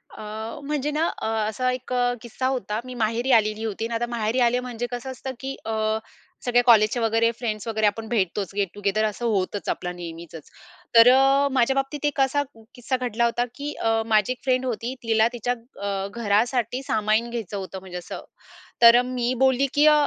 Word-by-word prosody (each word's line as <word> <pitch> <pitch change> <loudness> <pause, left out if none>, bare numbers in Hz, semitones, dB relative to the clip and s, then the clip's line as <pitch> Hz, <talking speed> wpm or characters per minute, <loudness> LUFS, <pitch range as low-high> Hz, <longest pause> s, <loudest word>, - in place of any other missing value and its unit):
अ, 220 +3 -6
म्हणजे 295 0 -2
ना 310 +3 +1
अ, - - -3 0.2
असा 255 +4 0
एक 255 0 -5 0.3
किस्सा 245 +2 -3
होता 220 -5 -2
मी 255 - -7
माहेरी 230 +3 0
आलेली 215 -1 +3
होती 220 0 -3
आणि 230 - -4
आता 240 +1 0
माहेरी 230 +1 -1
आले 245 0 +3
म्हणजे 245 -1 -4
कसं 245 +2 -5
असतं 260 +1 -6
की 270 0 -5
अ, 220 0 0 0.5
सगळ्या 245 0 +3
कॉलेजचे 225 0 +5
वगैरे 225 0 +2
फ्रेंड्स 220 -2 -3
वगैरे 220 -1 +1
आपण 220 +2 -2
भेटतोच 195 -3 -1
गेट 200 -3 0
टुगेदर 205 +1 0
असं 215 +3 -2
होतच 205 -2 -1
आपला 180 - -2
नेहमीचच 170 -2 -9 0.5
तर 230 +1 +9
अ, 270 +2 +4
माझ्या 260 0 +3
बाबतीत 275 +2 -2
एक 290 -1 -1
असा 285 +2 +2 0.3
किस्सा 250 +2 -2
घडला 235 -1 0
होता 240 +1 +1
की 290 +1 -5
अ, 225 0 0
माझी 215 +1 +2
एक 255 - -6
फ्रेंड 260 -1 +1
होती 240 +1 -3
तिला 225 -1 +3
तिच्या 245 +1 -1 0.3
अ, 195 -1 -2
घरासाठी 235 +3 0
सामान 220 0 +1
घ्यायचं 220 -4 -5
होतं 190 0 -6
म्हणजे 185 -1 -8
असं 180 0 -7 0.6
तर 235 +1 +9
मी 250 -1 -1
बोलली 265 +1 +3
की 295 +1 +5
अ, 305 - +8
230 Hz, 190 wpm, -24 LUFS, 215-255 Hz, 0.6 s, तर